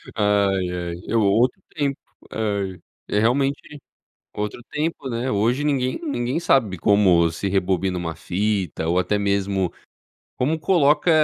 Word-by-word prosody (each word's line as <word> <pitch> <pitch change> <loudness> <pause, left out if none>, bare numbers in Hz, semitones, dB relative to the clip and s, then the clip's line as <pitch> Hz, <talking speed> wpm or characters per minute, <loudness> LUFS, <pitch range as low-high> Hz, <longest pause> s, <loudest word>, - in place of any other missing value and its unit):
Ai, 100 -3 +2
ai, 90 -1 -4
é - - -1
outro 115 +3 +2
tempo, 140 -2 -1 0.3
ai, 100 -4 -2 0.3
é 105 - +1
realmente 140 +5 0 0.6
outro 105 +3 -4
tempo, 150 -2 -2
né? 125 +1 -2
Hoje 115 +8 +1
ninguém 135 - 0
ninguém 140 - -2
sabe 115 - +2
como 90 -4 +4
se 90 +4 -3
rebobina 95 -1 0
uma 85 -2 -4
fita 95 -4 -2
ou 85 +2 +2
até 105 +3 +1
mesmo 100 -2 0 0.7
como 155 +6 0
coloca 150 -1 +3
105 Hz, 135 wpm, -22 LUFS, 95-135 Hz, 0.7 s, como